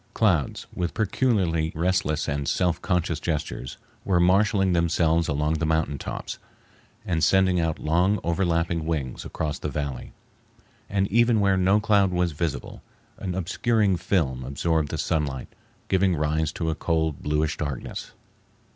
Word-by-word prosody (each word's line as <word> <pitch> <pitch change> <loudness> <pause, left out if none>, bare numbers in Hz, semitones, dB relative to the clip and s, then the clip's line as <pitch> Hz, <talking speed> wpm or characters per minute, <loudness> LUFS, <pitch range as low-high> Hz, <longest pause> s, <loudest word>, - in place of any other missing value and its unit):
Clouds, 90 - +1
with 90 -1 -3
peculiarly 95 -7 +1
restless 85 -3 0
and 70 -1 -2
self 90 -2 +1
conscious 85 -4 0
gestures, 75 -7 -3 0.3
were 90 -3 +2
marshaling 95 +1 +3
themselves 85 -1 +2
along 75 +1 0
the - - -2
mountain 80 -3 0
tops, - - -6 0.7
and 80 -3 0
sending 95 +1 +4
out 80 -1 0
long, 90 +6 +2
overlapping 85 -2 0
wings 70 -6 -3
across 75 -2 -3
the 75 - -3
valley; 70 -2 -4 0.8
and 100 0 +1
even 115 +1 +4
where 100 -1 +3
no 95 +3 +3
cloud 105 -2 +3
was 90 -1 +1
visible, 80 +2 -4 0.4
an 90 -2 -3
obscuring 105 +2 +1
film 85 -8 0
absorbed 75 +3 0
the - - -3
sunlight, 70 -5 -2 0.4
giving 95 -1 +2
rise 75 0 0
to 80 0 -2
a - - 0
cold, 80 -2 -1
bluish 75 +1 0
darkness. 70 -5 -5
85 Hz, 140 wpm, -25 LUFS, 75-95 Hz, 0.8 s, sending